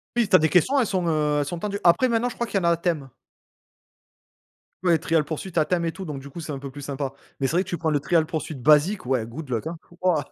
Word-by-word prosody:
Oui, 240 -2 +2
tu 190 - +4
as - - +8
des 155 0 +2
questions, 185 - +3
elles 240 - +2
sont, 185 -3 -1
heu, 150 -2 +1
elles 145 - 0
sont 170 +4 -4
tendues. 200 +2 -3
Après, 180 +9 +5
maintenant, 235 +1 +1
je - - -9
crois 235 - -2
qu'il 205 - -1
y - - -5
en - - -5
a - - +5
à 170 - +2
thème. 165 -5 -2 1.7
Ouais, 170 -3 +4
Trial 160 -2 +1
Pursuit, 160 +5 -5
à 155 - +4
thème 175 0 0
et 165 - 0
tout, 190 +3 -8
donc 145 -4 -5
du 140 - -10
coup 155 - -9
c'est 155 -2 -6
un 140 - -4
peu 140 0 -7
plus 145 +2 -9
sympa, 135 -1 -3 0.3
mais 135 - +1
c'est - - -3
vrai 180 - +3
que - - -12
tu 175 - -2
prends 160 - 0
le 150 -2 +2
Trial 160 +1 +2
Pursuit 160 -1 -4
basique 150 - +3
ouais 125 -4 +1
good 140 +5 -8
luck 115 0 -2
hein, 165 +1 -4 0.2
waouh. 180 -5 +2
160 Hz, 295 wpm, -24 LUFS, 145-185 Hz, 1.7 s, as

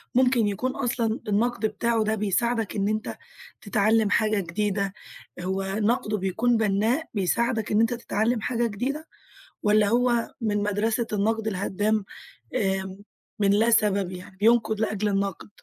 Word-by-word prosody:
ممكن 250 -3 +4
يكون 250 +6 -1
أصلًا 235 -4 -1
النقد 230 +2 +1
بتاعُه 225 +1 0
ده 215 +1 0
بيساعدك 220 +2 0
إن 200 -1 0
أنت 215 0 -3 0.4
تتعلم 215 +1 +2
حاجة 215 -1 +2
جديدة، 195 +2 -1 0.5
هو 190 +2 -2
نقدُه 210 +2 0
بيكون 220 +5 +1
بنّاء 220 +8 +1
بيساعدك 220 +3 0
إن 210 - +3
أنت 230 +1 +2
تتعلم 230 -1 -1
حاجة 235 0 0
جديدة، 270 +9 -3 0.6
والَّا 210 0 +4
هو 240 0 +2
من 205 -2 0
مدرسة 220 +3 0
النقد 220 +2 0
الهدام، 205 +1 0 0.5
امم، 190 -1 -1 0.4
من 200 -1 +3
لا 220 +3 +3
سبب، 200 -4 +2
يعني 185 +1 -10
بينقد 220 0 +3
لأجل 215 -1 0
النقد؟ 195 -1 -2
215 Hz, 140 wpm, -25 LUFS, 200-230 Hz, 0.6 s, ممكن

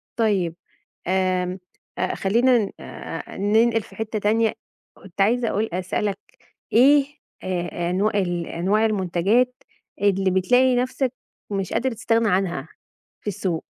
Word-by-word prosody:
طيب. 195 -7 +1 0.5
آمم، 185 0 0 0.5
خلّينا 235 +2 +2
آآ، - - -8
ننقل 225 +3 +3
في - - -15
حتّة 220 -1 -3
تانية، 220 +2 +2 0.4
كنت 195 0 -7
عايزة 230 +3 +2
أقول 220 +2 -1
أسألك 190 +2 -1 0.6
إيه 275 +4 +6 0.4
أ 175 -1 -2
أنوا 205 +4 +1
الأنواع 175 +4 0
المنتجات 210 +4 +1 0.5
اللي 195 -2 +2
بتلاقي 250 +7 +3
نفسك 255 +1 0 0.4
مش 195 -3 -3
قادر 250 +3 0
تستغنى 225 0 +1
عنها 180 -7 0 0.5
في - - -13
السوق؟ 185 -4 -2
205 Hz, 115 wpm, -23 LUFS, 185-230 Hz, 0.6 s, إيه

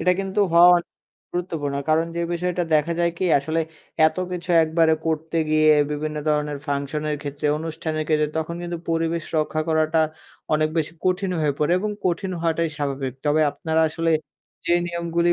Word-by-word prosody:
এটা 180 +2 +3
কিন্তু 195 +2 -1
হওয়া 170 +1 +8
অনে 175 - -3 0.4
গুরুত্বপূর্ণ। 165 -5 -3
কারণ 160 +1 +3
যে 170 - 0
বিষয়টা 180 +1 -1
দেখা 155 +2 +2
যায় 170 -1 +2
কি? - - 0
আসলে 160 +4 -1 0.5
এত - - -1 0.2
কিছু 180 0 -5
একবারে 160 0 +3
করতে 160 +1 -2
গিয়ে 155 0 +5 0.2
বিভিন্ন 150 +1 -3
ধরনের 150 -1 0
ফাংশনের 150 +1 -2
ক্ষেত্রে, 145 0 -4
অনুষ্ঠানের 160 -1 -3
ক্ষেত্রে। 150 -1 +2
তখন 160 +1 -3
কিন্তু 170 -1 -4
পরিবেশ 165 0 0
রক্ষা 155 0 0
করাটা 160 0 +2 0.5
অনেক 155 0 +2
বেশি 160 +1 -1
কঠিন 185 +1 +1
হয়ে 150 -2 +2
পড়ে 150 +3 +2
এবং 210 +2 -2 0.2
কঠিন 185 +2 -1
হওয়াটাই 165 -1 0
স্বাভাবিক। 135 -3 -2
তবে 150 +2 +3
আপনারা 160 +2 -1
আসলে 165 0 0 0.5
যে 170 - +4
নিয়মগুলি 170 0 +1
160 Hz, 165 wpm, -23 LUFS, 155-170 Hz, 0.5 s, হওয়া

